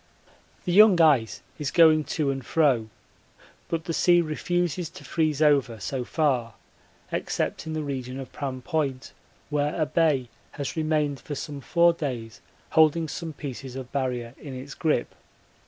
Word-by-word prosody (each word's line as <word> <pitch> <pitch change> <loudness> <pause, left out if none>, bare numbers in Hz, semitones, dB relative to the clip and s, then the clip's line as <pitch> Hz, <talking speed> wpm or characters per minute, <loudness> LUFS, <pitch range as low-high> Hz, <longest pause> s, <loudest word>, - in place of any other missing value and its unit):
The 180 - 0
young 205 -2 +7
ice 140 -9 +3 0.2
is 145 -2 -1
going 155 -1 +5
to 145 0 0
and 135 -1 -4
fro, 130 -6 +2 0.8
but 165 -1 -2
the 165 - -3
sea 175 +1 +4
refuses 175 +1 -1
to - - -13
freeze 155 -2 0
over 135 -6 +3
so 130 +5 -3
far 125 - 0 0.6
except - - -2
in 160 - -3
the 155 -1 -2
region 130 -2 -4
of 135 - -8
Pram 130 -3 -5
Point, 140 -9 -2 0.4
where 150 +2 0
a 155 - +3
bay 150 -5 +1 0.2
has 140 -2 -4
remained 155 -3 0
for 145 - -6
some 140 0 -6
four 170 +4 +4
days 125 -8 -5 0.3
holding 160 0 +4
some 165 +1 -5
pieces 135 -3 -7
of 130 -1 -7
Barrier 125 -3 -2
in 140 -4 -8
its 135 +2 -8
grip. 155 -6 0
145 Hz, 155 wpm, -26 LUFS, 130-160 Hz, 0.8 s, young